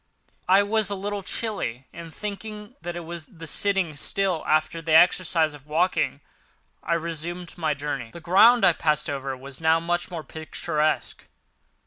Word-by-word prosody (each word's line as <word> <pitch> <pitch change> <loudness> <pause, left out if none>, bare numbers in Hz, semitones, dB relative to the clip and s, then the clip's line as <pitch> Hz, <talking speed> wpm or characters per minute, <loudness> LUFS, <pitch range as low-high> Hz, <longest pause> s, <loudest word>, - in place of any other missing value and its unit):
I 195 +2 +6
was 215 -1 +2
a 200 - -1
little 200 +1 -3
chilly, 190 - -3
and, 165 -1 -9
thinking 210 +3 -7
that 175 0 -5
it 175 - -4
was 170 -1 -7
the 165 -3 -11
sitting 190 -1 +1
still 185 +2 -1
after 155 +2 +1
the 160 -1 -1
exercise 165 -2 +4
of 145 -1 -14
walking, 170 +5 0 0.6
I 170 - 0
resumed 170 +1 -5
my 155 -4 -1
journey. 140 -5 -4
The 170 - -10
ground 200 +9 +6
I 175 - +6
passed 150 -2 0
over 135 -1 -4
was 135 +3 -7
now 160 0 +4
much 175 +1 -1
more 170 -3 -6
picturesque. 155 0 -2
170 Hz, 160 wpm, -25 LUFS, 155-190 Hz, 0.6 s, I